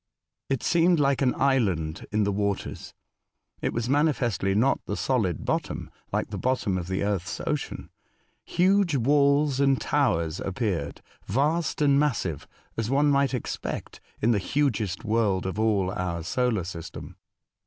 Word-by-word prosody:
It 135 -3 -1
seemed 170 0 +3
like 140 -1 +2
an 130 -2 +2
island 95 - 0
in 105 0 +2
the 100 - +1
waters. 100 0 -3 0.7
It - - 0
was 115 0 -2
manifestly 125 - +1
not 130 +6 +2
the 100 - -2
solid 110 - 0
bottom, - - -2 0.2
like - - -1
the - - -4
bottom 125 -6 0
of 90 -2 -3
the 95 +1 -1
earth's 100 -3 -2
ocean. - - -3 0.5
Huge 185 -2 +2
walls 140 +2 +3
and 135 -1 +3
towers 85 - 0
ap 95 - -4
peared, 90 -11 -2 0.3
vast 150 - +1
and 140 -1 +4
massive, 110 - -1 0.3
as 115 0 -2
one 145 +2 +3
might 140 -1 +2
expect 125 - -5 0.2
in 115 - +2
the 105 - +2
hugest 115 - -1
world 105 -4 +1
of 95 +3 -3
all 100 -4 +2
our 90 -4 -3
solar 115 +2 0
system. 85 -1 -8
115 Hz, 150 wpm, -26 LUFS, 95-140 Hz, 0.7 s, and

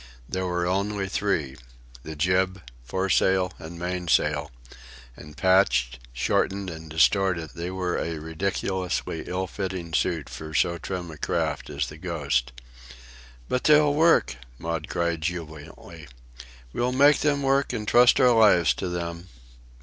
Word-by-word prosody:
There 95 0 -2
were 90 0 -1
only 100 +2 -1
three—the 65 -8 -4
jib, 90 +3 0 0.2
foresail, 95 +4 +1
and 85 0 -9
mainsail; 85 -4 0 0.7
and, 75 -1 -13
patched, 95 -9 +2
shortened, 95 +10 -1
and 80 0 -10
distorted, 85 0 +2
they 85 +1 -5
were 90 -1 -2
a 85 -1 -3
ridiculously 90 +3 -3
ill 95 +1 -2
fitting 95 -3 -5
suit 80 -4 0
for 80 0 -8
so 85 0 +1
trim 90 0 -5
a 75 - -12
craft - - -2
as 70 -1 -2
the 75 - -10
Ghost. 70 -8 -1 1.0
"But 125 - -2
they'll 150 -1 +5
work!" 155 - +3 0.2
Maud 85 +1 -4
cried 85 -1 -1
jubilantly. 80 -3 -7 0.7
"We'll 125 +1 0
make 145 +3 +5
them 145 -2 +1
work, 135 +1 +2
and 105 -1 -4
trust 120 +2 +5
our 125 - +6
lives 95 - +5
to 90 - -4
them!" 85 0 -5
90 Hz, 135 wpm, -25 LUFS, 80-95 Hz, 1.0 s, our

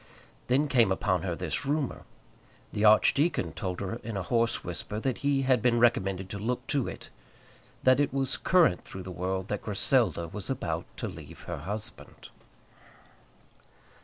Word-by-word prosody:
Then 135 +4 +3
came 120 -7 +4
upon 95 -2 +1
her 90 -2 -2
this - - -3
rumour. 145 -1 -2 0.7
The 105 - -1
archdeacon 135 +9 +4
told 95 -4 -4
her 100 +3 -3
in 110 -2 -5
a 95 - -2
hoarse 115 +1 +1
whisper 90 +4 -5
that 130 +1 -2
he 140 -1 +1
had 130 -3 +3
been 120 0 +3
recommended 95 -5 +2
to 100 - -4
look 125 +4 -2
to 140 -4 +1
it, - - -8 0.7
that 130 +1 +5
it 145 - +2
was 135 -1 0
current 175 - +3
through 95 - -8
the 95 - -7
world 95 +1 -2
that 105 - -2
Griselda 100 - +1
was 100 +4 -7
about 85 -11 -2
to - - -3
leave - - -10
her - - -5
husband. 105 +2 -5
110 Hz, 160 wpm, -29 LUFS, 95-130 Hz, 0.7 s, that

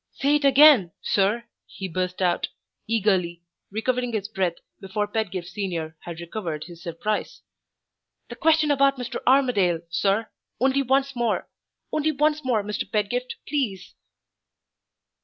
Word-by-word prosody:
"Say 285 +2 +2
it 295 - -3
again, 275 - +7
sir!" 205 +4 +1 0.2
he 190 - -6
burst 185 +1 -2
out, 175 -1 +1 0.4
eagerly, 190 -6 +1 0.3
recovering 245 +3 -1
his 205 -2 -2
breath 190 -5 -1 0.2
before 205 +2 -2
Pedgift 195 -5 -3
Senior 175 -5 -4
had 170 -1 -8
recovered 170 -3 -5
his 170 -1 -12
surprise. 175 +6 -3 0.8
"The - - -8
question 315 -2 +3
about 275 -1 +3
Mr. 250 -2 -4
Armadale, 240 -11 +3
sir! 200 +5 +1 0.3
only 265 +2 +3
once 270 +1 +1
more! 235 -2 0 0.4
only 310 +1 +1
once 300 +1 +1
more, 240 -5 +1
Mr. 210 +1 -4
Pedgift, 245 +4 -1
please!" 255 -10 -2
215 Hz, 130 wpm, -24 LUFS, 185-265 Hz, 0.8 s, again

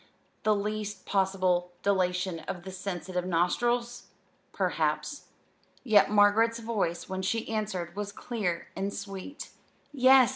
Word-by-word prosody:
the 215 -1 +3
least 210 -1 -3
possible 185 -2 +1
dilation 185 -3 +1
of 175 -2 -4
the 190 - -7
sensitive 185 -1 -3
nostrils? 235 +8 0 0.4
Perhaps. - - -1 0.6
Yet 220 -5 +5
Margaret's 210 +3 +4
voice 215 -7 -2
when 190 0 -3
she 225 +4 -1
answered, 195 -6 -3
was 205 0 -3
clear 200 -6 -3
and 195 +1 -2
sweet. 200 +8 -7 0.4
"Yes. 260 -2 +6
200 Hz, 115 wpm, -29 LUFS, 185-220 Hz, 0.6 s, Yes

